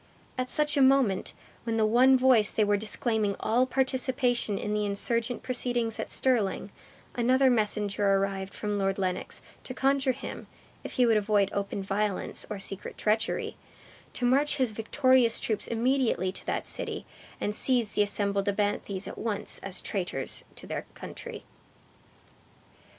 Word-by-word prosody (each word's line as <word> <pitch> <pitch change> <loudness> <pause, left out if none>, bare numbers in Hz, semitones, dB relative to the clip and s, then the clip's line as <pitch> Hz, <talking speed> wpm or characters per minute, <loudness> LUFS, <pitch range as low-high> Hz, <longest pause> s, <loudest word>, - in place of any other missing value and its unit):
At 255 0 -2
such 300 -1 +1
a - - +4
moment, 260 -7 +3 0.3
when 230 -1 -1
the 220 - +3
one 255 +4 +5
voice 250 -5 +4
they 215 - +2
were 205 0 +3
disclaiming 215 0 0
all 245 +4 +2
participation 255 -4 0
in 210 - -3
the 210 0 0
insurgent 225 +4 -1
proceedings 245 -3 -1
at - - -3
Stirling, 215 -6 +1 0.4
another 255 +2 +3
messenger 210 -2 0
arrived 195 0 -1
from 210 -1 -3
Lord 195 0 0
Lennox, 185 -2 -3 0.2
to 255 - -7
conjure 270 0 +2
him, 260 - -8 0.4
if - - -7
he 250 - +3
would 225 -2 +4
avoid 205 -1 +2
open 200 0 -2
violence 200 0 -2
or 210 - -4
secret 195 0 -6
treachery, 220 +2 0 0.6
to 245 - -2
march 280 +5 +3
his 255 -4 +1
victorious 245 +2 +3
troops 215 -3 -2
immediately 235 -5 +1
to - - -9
that - - -1
city, - - -3 0.3
and 210 - -1
seize 240 -1 +1
the - - +2
assembled 200 -1 +1
abthanes 200 -1 -1
at - - -7
once 210 -2 -3
as 195 -1 -3
traitors 180 -9 -3
to - - -10
their - - -5
country. - - -8
220 Hz, 150 wpm, -28 LUFS, 200-255 Hz, 0.6 s, one